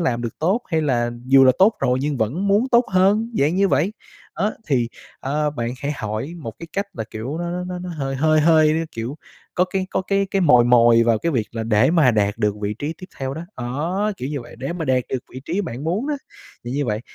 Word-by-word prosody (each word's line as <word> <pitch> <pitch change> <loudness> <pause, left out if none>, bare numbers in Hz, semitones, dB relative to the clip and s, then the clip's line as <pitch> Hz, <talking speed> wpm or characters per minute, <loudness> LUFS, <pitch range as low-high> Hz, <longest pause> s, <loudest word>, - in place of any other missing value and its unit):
làm 120 -8 0
được 115 - -5
tốt?" 190 +9 +1
Hay 160 -3 +1
là 120 -4 +1 0.2
"Dù 135 0 +7
là 130 - +6
tốt 205 +4 +5
rồi 125 +1 +2
nhưng 145 +1 -1
vẫn 135 - -1
muốn 210 +6 +3
tốt 240 -1 +4
hơn?" 200 +5 +3
Dạng 145 +4 +2
như 195 +1 +3
vậy. 185 +4 +1 0.4
Đó, 205 +7 0
thì, 125 -6 +1 0.3
ờ, 150 +2 0
bạn 120 -5 -3
hãy 145 +1 -2
hỏi 110 +5 -4
một 115 -8 -6
cái 170 - -8
cách 200 +1 -1
là, 110 - -3
kiểu, 125 +9 -5
nó 175 0 -3
nó 180 +1 -3
nó 180 0 -5
nó 180 - -6
hơi 135 -5 -3
hơi 155 +2 +3
hơi, 155 0 +4
kiểu, 115 +5 -5 0.4
có 180 - +3
cái 185 0 -2
có - - 0
cái 195 +1 0
cái 195 - +1
mồi 125 -9 +6
mồi 120 -1 +6
vào 115 -1 +2
cái 170 +8 -1
việc 115 -6 0
là 115 -1 -3
để 115 +4 +3
mà 160 -6 +5
đạt 105 -3 0
được 105 -1 +1
vị 105 0 -2
trí 150 +3 -3
tiếp 185 - -9
theo 135 0 -3
đó, 160 - -6
đó, 165 +12 -2
kiểu 130 - -4
như 145 -1 -3
vậy, 120 - -12
để 135 +5 -3
mà 170 -2 -4
đạt 130 -2 +2
được 130 - -1
vị 130 - -7
trí 175 +6 -1
bạn 145 - -5
muốn 200 - -1
á. 300 - 0 0.5
Thì 120 - -5
như 145 +2 -1
vậy, 105 -1 -1
150 Hz, 250 wpm, -21 LUFS, 120-180 Hz, 0.5 s, Dù